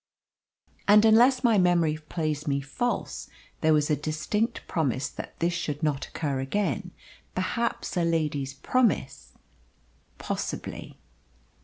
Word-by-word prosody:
"And, 210 +1 +7
unless 245 +4 +5
my 230 -4 +5
memory 175 -4 +3
plays 155 -1 -3
me 140 -1 +1
false, 145 - -3 0.3
there 160 - +3
was 150 0 +3
a - - +4
distinct 155 - -2
promise 140 -4 0
that - - -9
this 170 +1 0
should 160 -3 -3
not 150 -3 0
occur 140 -4 -2
again. 135 - -1 0.5
Perhaps 230 +6 -2
a 175 - +2
lady's 150 -5 -1
promise 225 - 0 0.4
" - - -37
"Possibly." - - -4
160 Hz, 125 wpm, -27 LUFS, 145-205 Hz, 0.5 s, And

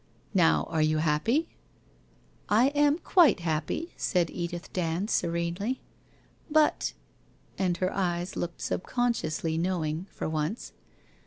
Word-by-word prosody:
Now, 175 -5 +4
are 160 -2 +1
you 155 0 +2
happy? 165 - +1 0.5
' - - -34 0.2
'I 230 +6 +5
am 290 +1 +3
quite 340 - +4
happy/ 170 - -2
said 175 -3 0
Edith 175 0 -5
Dand 180 +4 -1
serenely. 170 +8 -1 0.4
* - - -34
But 305 - +2 0.3
' - - -33
And 180 -3 +1
her 185 +1 -1
eyes 175 -1 -1
looked 175 -1 -4
subconsciously 170 -9 -1
knowing, 170 -1 -1
for - - -5
once. 155 +7 -3
175 Hz, 130 wpm, -28 LUFS, 165-225 Hz, 0.5 s, I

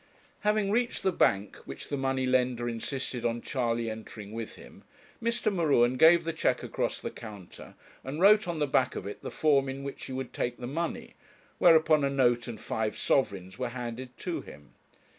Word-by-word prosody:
Having 210 -1 +1
reached 240 +2 0
the 190 - +3
bank, 100 - +1
which - - -9
the 145 - -1
money 135 -1 0
lender 125 -2 +1
insisted 125 +1 -3
on 120 0 0
Charley 120 -4 -1
entering 110 -2 -7
with 115 0 -6
him, - - -14 0.4
Mr. 230 -2 0
M'Ruen 140 -8 +3
gave 165 +5 +6
the 165 0 -2
cheque 160 - 0
across - - -2
the - - -5
counter, 105 -5 -11 0.3
and 135 +4 -5
wrote 210 +3 +6
on 170 -2 -2
the 150 - +1
back 130 -2 +1
of - - -5
it 100 - -7
the - - -5
form 140 -3 +2
in 135 +1 -5
which 140 0 -6
he - - -8
would 130 -1 -5
take 120 0 -2
the 125 - -6
money, 165 +6 -3 0.5
whereupon 160 -3 +6
a 140 - +2
note 120 -3 +2
and 115 -2 -6
five 110 -1 -2
sovereigns 95 -6 0
were 125 -1 -1
handed 125 0 -6
to - - -3
him. 70 -2 -14
130 Hz, 190 wpm, -29 LUFS, 120-155 Hz, 0.5 s, gave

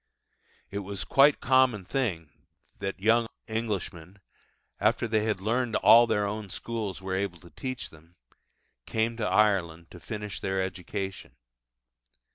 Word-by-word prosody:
It 100 - -3
was 100 0 -5
quite 140 +1 +5
a - - -16
common 130 -7 +3
thing 90 - -2 0.5
that 95 0 -4
young 115 +3 +3 0.2
Englishmen, 100 -5 -4 0.6
after 120 - +2
they 110 -1 +1
had 110 -3 0
learned 115 +3 0
all 120 +1 +7
that 110 - +1
their 105 0 +1
own 105 0 -4
schools 105 -3 -5
were 95 0 -3
able 95 -2 -2
to 85 +1 -16
teach 130 -1 -5
them, 80 +2 -19 0.7
came 115 +1 0
to 110 - -1
Ireland 85 -6 +1
to 90 - -11
finish 105 0 -6
their 95 0 -1
education. 95 +1 -5
105 Hz, 145 wpm, -28 LUFS, 95-115 Hz, 0.7 s, all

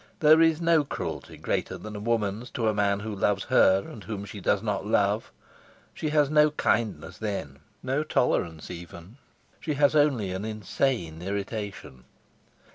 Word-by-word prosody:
There 155 +1 +6
is 165 -1 +4
no 165 -2 +3
cruelty 140 - -6
greater - - -2
than 110 0 -8
a - - -5
woman's 110 +1 -1
to 115 -2 +1
a 110 - +2
man 100 -1 +1
who 110 0 -5
loves 100 0 +1
her 95 +1 +4
and 110 - -10
whom 105 -2 -5
she 100 -1 -9
does - - +1
not - - -1
love; - - +1 0.6
she 155 - -3
has 150 -1 +3
no 150 +1 +5
kindness 105 - -1
then, 100 -11 -4 0.2
no 135 +4 0
tolerance 85 - 0
even, 85 +5 -10 0.4
she 155 -2 -3
has 145 +1 +3
only 135 -10 +2
an 95 +2 -4
insane 105 - -2
irritation. 100 - -5
110 Hz, 160 wpm, -27 LUFS, 100-140 Hz, 0.6 s, There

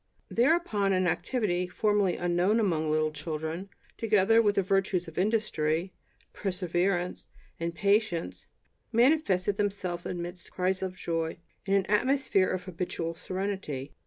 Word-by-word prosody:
Thereupon 235 - +2
an 185 0 +2
activity 180 -1 0
formerly 205 -1 +1
unknown 175 +5 +2
among 165 -7 +1
little 155 0 +1
children, 160 +4 -4 0.3
together 225 0 +4
with 205 -2 +2
the 195 - +2
virtues 190 -1 +1
of 165 +1 -5
industry, 185 -5 0 0.4
perseverance 180 -1 -1 0.3
and 170 0 -3
patience, 195 - 0 0.4
manifested 230 - +3
themselves 190 -4 -2
amidst 175 0 -4
crises 185 +1 0
of 185 -1 -3
joy, 165 -1 -2 0.3
in 195 - +3
an 195 -1 +2
atmosphere 245 -2 +2
of 185 -1 -2
habitual 175 -2 -4
serenity. 185 -7 -4
185 Hz, 125 wpm, -29 LUFS, 170-205 Hz, 0.4 s, together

